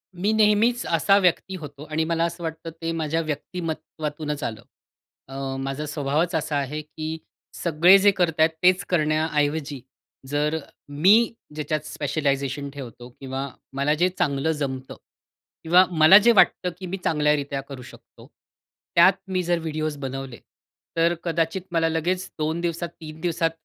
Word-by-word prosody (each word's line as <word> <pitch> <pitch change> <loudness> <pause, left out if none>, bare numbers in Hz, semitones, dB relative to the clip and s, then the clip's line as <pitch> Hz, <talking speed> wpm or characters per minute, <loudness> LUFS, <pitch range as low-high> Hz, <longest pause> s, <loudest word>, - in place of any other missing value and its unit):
मी 195 +4 0
नेहमीचं 220 +3 +3
असा 195 +4 +4
व्यक्ती 190 0 +1
होतो 145 -4 -9
आणि 155 +1 +1
मला 165 0 0
असं 170 0 -5
वाटतं 160 0 -5
ते 165 0 -2
माझ्या 165 0 -1
व्यक्तिमत्त्वातूनचं 155 -1 -4
आलं. 110 -2 -5 0.7
अ, 135 0 -5
माझा 135 +2 -3
स्वभावचं 150 +3 0
असा 155 -1 -2
आहे, 145 +2 -3
की 155 +1 -6 0.4
सगळे 170 +3 +5
जे 205 +1 +5
करताय 165 -4 +2 0.2
तेच 185 +1 +4
करण्याऐवजी, 155 -3 0 0.5
जर 150 +3 0 0.3
मी 195 +12 +4 0.2
ज्याच्यात 155 0 -2
स्पेशलायझेशन 140 -2 -2
ठेवतो 125 -3 -10
किंवा 135 0 -4 0.3
मला 140 +2 +1
जे 175 +4 +2
चांगलं 140 +2 +1
जमतं 135 -4 -4 0.7
किंवा 175 +3 +6
मला 160 +3 +8
जे 225 +3 +5
वाटतं, 190 -4 +4
की 190 - -6
मी 185 +2 -4
चांगल्यारित्या 150 -2 +1
करू 135 -1 -10
शकतो. - - -15 0.7
त्यात 170 +3 +7
मी 185 -1 -1
जर 175 0 +1
व्हिडिओज 155 -2 -3
बनवले, 135 -2 -6 0.6
तर 165 +1 +4
अ, - - -1
कदाचित 165 +2 -1
मला 165 -1 +2
लगेच 175 +3 -1
2 160 +2 -1
दिवसात, 170 0 -2
3 155 -1 -11
दिवसात 165 -1 0
155 Hz, 145 wpm, -24 LUFS, 145-170 Hz, 0.7 s, मला